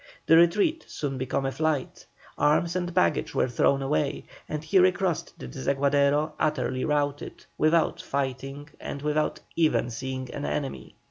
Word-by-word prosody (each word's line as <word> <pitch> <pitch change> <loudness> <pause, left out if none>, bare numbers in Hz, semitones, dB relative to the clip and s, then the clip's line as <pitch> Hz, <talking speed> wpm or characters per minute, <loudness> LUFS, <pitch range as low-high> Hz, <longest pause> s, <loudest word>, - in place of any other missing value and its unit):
The 165 - +6
retreat 205 - +4
soon 135 -3 -4
became 130 +1 -1
a 135 - 0
flight, 155 -2 -2 0.3
arms 165 +4 +2
and 175 -1 -1
baggage 180 +1 +1
were - - +2
thrown 135 +3 +2
away, 80 -13 -1 0.2
and 150 0 -3
he 175 +5 +3
recrossed 185 -2 +1
the 65 - -8
Desaguadero 140 - +1
utterly 130 -4 0
routed, 145 -1 -2
without 160 +1 +2
fighting 135 +1 -3
and 140 - -6
without 150 0 0
even 155 -7 +2
seeing 130 +2 -5
an 145 - -5
enemy. 140 -2 -4
145 Hz, 145 wpm, -26 LUFS, 135-160 Hz, 0.3 s, The